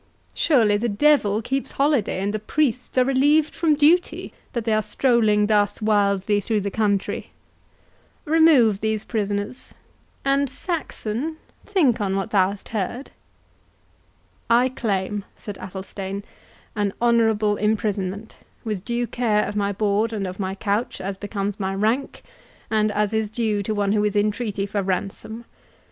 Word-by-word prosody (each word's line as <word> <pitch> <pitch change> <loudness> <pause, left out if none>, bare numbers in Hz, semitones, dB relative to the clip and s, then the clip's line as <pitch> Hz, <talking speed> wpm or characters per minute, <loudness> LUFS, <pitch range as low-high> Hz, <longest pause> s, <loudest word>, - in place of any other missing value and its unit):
Surely 225 -10 +3
the 235 +3 -1
devil 220 -3 +3
keeps 270 +3 -2
holiday, 275 -9 +1
and 200 +1 -1
the 215 - -1
priests 250 +2 -1
are 255 - +5
relieved 290 +3 +3
from 320 -3 +2
duty, 315 +5 +2 0.2
that 235 -3 -2
they 225 - +2
are 215 - +3
strolling 220 -4 +2
thus 205 -1 +2
wildly 205 -1 +2
through 215 +1 0
the 200 0 -3
country. 200 -2 -1 1.0
Remove 295 -10 +5
these 220 0 -1
prisoners; 205 +1 -3 0.5
and, 275 0 +2
Saxon, 310 - -4 0.3
think 295 - +2
on 195 -1 0
what 195 +3 -2
thou 190 -2 +4
hast 200 0 -9
heard." 225 +5 -4 1.4
"I 240 +2 +4
claim," 205 -4 -2
said 205 -2 -8
Athelstane, 195 +1 -6 0.5
"an 205 -2 0
honourable 225 -3 +2
imprisonment, 210 -1 -2 0.3
with 210 -5 -3
due 240 +1 -1
care 225 -3 0
of 205 - -5
my 200 -1 0
board 210 +2 0
and 205 -3 -2
of 185 +1 -6
my 190 -1 -2
couch, 205 +2 -2
as 190 +1 -4
becomes 205 0 -4
my 195 -1 -2
rank, 225 +7 -1 0.5
and 215 -1 +2
as 210 +1 0
is 220 -1 0
due 215 -2 -1
to 215 +2 -2
one 200 -1 +1
who 210 0 +2
is 210 0 0
in 210 +1 +3
treaty 205 -3 -3
for 200 0 -2
ransom. 195 +4 -4
215 Hz, 150 wpm, -23 LUFS, 200-240 Hz, 1.4 s, are